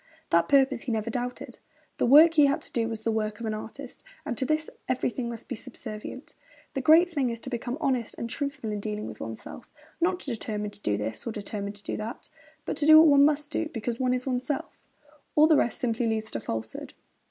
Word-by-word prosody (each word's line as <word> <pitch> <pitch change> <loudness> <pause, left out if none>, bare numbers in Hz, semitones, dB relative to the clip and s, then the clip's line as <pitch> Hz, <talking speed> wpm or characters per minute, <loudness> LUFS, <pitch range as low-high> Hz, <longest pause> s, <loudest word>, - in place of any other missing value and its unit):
That 170 0 +3
purpose 270 -3 +4
he 250 - -4
never 220 0 -1
doubted. 245 +1 -5 0.4
The - - +1
work 310 +6 +8
he 300 -3 +6
had 280 - +1
to - - -9
do 230 -1 0
was 225 -1 -5
the 225 - 0
work 215 -1 -2
of 235 - -5
an 220 - -1
artist, 245 +5 -8 0.2
and - - -2
to 260 - -1
this 310 +3 0 0.2
everything 250 -1 -1
must 230 -1 -8
be - - -4
subservient. 230 +1 -8 0.4
'The 270 - -2
great 320 +6 +6
thing 285 -8 -1
is 230 -1 -4
to 260 - -6
become 240 +2 -3
honest 255 -7 -1
and 235 - -3
truthful 280 -2 -3
in 210 - -3
dealing 210 0 -4
with - - -8
oneself - - -8 0.3
not 360 +1 +2
to 275 - -4
determine 210 -2 -3
to - - -10
do 105 - 0
this 110 - -5
or - - -1
determine 205 -1 -5
to 205 0 -11
do - - -3
that, 220 +3 -7 0.3
but - - -3
to 295 - +1
do 310 0 +10
what 320 0 +8
one 280 0 +7
must 295 0 0
do 320 - -1
because 230 -2 -4
one 255 -1 +2
is 250 - -4
oneself. 260 +2 -2 0.6
All 300 - +7
the 315 0 +5
rest 240 - +1
simply 235 -1 0
leads 220 -1 -2
to - - -3
falsehood.' 110 0 -5
245 Hz, 230 wpm, -27 LUFS, 220-280 Hz, 0.6 s, do